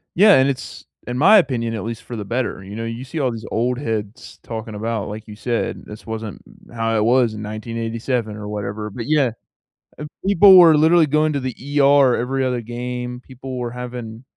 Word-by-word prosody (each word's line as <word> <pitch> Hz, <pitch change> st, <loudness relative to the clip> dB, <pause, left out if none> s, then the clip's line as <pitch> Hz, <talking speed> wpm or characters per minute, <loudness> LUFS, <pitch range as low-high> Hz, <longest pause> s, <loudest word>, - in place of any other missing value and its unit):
Yeah, 205 Hz, +3 st, +7 dB
and 130 Hz, +1 st, +4 dB
it's, 130 Hz, -2 st, -6 dB, 0.2 s
in 125 Hz, +1 st, -3 dB
my 205 Hz, +9 st, +7 dB
opinion, 120 Hz, -, 0 dB
at 110 Hz, -, -4 dB
least 115 Hz, 0 st, -6 dB
for 120 Hz, -, -8 dB
the 105 Hz, -2 st, -5 dB
better, 120 Hz, -3 st, -3 dB
you 100 Hz, +2 st, -9 dB
know, 115 Hz, +1 st, -4 dB
you 115 Hz, +2 st, -5 dB
see 155 Hz, +5 st, -6 dB
all 130 Hz, -4 st, +1 dB
these 115 Hz, -1 st, -7 dB
old 125 Hz, +2 st, 0 dB
heads 110 Hz, -2 st, -5 dB
talking 110 Hz, -1 st, -6 dB
about, 110 Hz, 0 st, -3 dB
like 110 Hz, +2 st, -8 dB
you 105 Hz, -, -9 dB
said, 120 Hz, +2 st, -3 dB
"This 105 Hz, +1 st, -11 dB
wasn't 110 Hz, -2 st, -6 dB, 0.3 s
how 115 Hz, -1 st, -1 dB
it 105 Hz, -, +2 dB
was 120 Hz, -1 st, +3 dB
in 105 Hz, -, -7 dB
1987," 115 Hz, +1 st, -3 dB
or 105 Hz, -1 st, -7 dB
whatever, 105 Hz, +1 st, -4 dB
but 115 Hz, +3 st, -7 dB
yeah, 145 Hz, -5 st, +2 dB, 0.7 s
and 150 Hz, 0 st, -7 dB, 0.2 s
people 195 Hz, 0 st, +7 dB
were 165 Hz, -4 st, +8 dB
literally 160 Hz, +1 st, +5 dB
going 150 Hz, +1 st, +1 dB
to 140 Hz, -, -1 dB
the 130 Hz, -2 st, -4 dB, 0.3 s
ER 140 Hz, -2 st, +5 dB
every 130 Hz, +3 st, -1 dB
other 125 Hz, -2 st, -1 dB
game, 125 Hz, +1 st, -5 dB
people 130 Hz, 0 st, -8 dB
were 120 Hz, -1 st, -3 dB
having 125 Hz, -1 st, -7 dB
120 Hz, 205 wpm, -20 LUFS, 110-130 Hz, 0.7 s, were